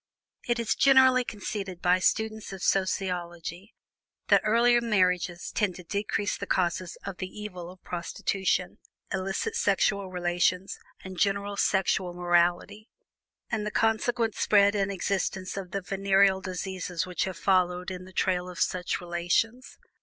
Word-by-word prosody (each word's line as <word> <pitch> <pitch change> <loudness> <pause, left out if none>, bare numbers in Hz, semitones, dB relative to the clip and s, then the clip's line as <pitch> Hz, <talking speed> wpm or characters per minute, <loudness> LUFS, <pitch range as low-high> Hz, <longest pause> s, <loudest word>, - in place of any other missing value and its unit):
It 240 0 +1
is 230 -1 0
generally 260 -2 +5
conceded 200 -4 -5
by 180 +1 +3
students 220 +2 0
of 190 -1 -7
sociology 180 -1 -2 0.5
that - - +6
earlier 240 +2 +4
marriages 180 -5 0
tend 200 -5 0
to 180 - -10
decrease 200 +2 -2
the 200 - -5
causes 180 -1 -1
of 195 -2 -5
the 185 - -4
evil 185 -3 -8
of 185 0 -15
prostitution, 180 +1 -2 0.3
illicit 190 0 -2
sexual 200 -1 +1
relations, 180 +1 0 0.2
and 185 -2 -8
general 200 0 0
sexual 190 -2 +1
morality; 175 +4 +1 0.6
and 220 -2 -1
the 210 - -2
consequent 225 +1 +1
spread 200 -1 +4
and 200 -1 0
existence 190 -1 -2
of 195 -2 -5
the 195 +2 -3
venereal 195 0 +2
diseases 185 -2 -4
which 180 -3 -2
have 190 -3 -5
followed 180 -1 +1
in 185 0 -7
the 185 - -13
trail 180 -1 0
of 180 - -9
such 180 +1 -1
relations. 175 +8 -1
190 Hz, 140 wpm, -27 LUFS, 180-205 Hz, 0.6 s, that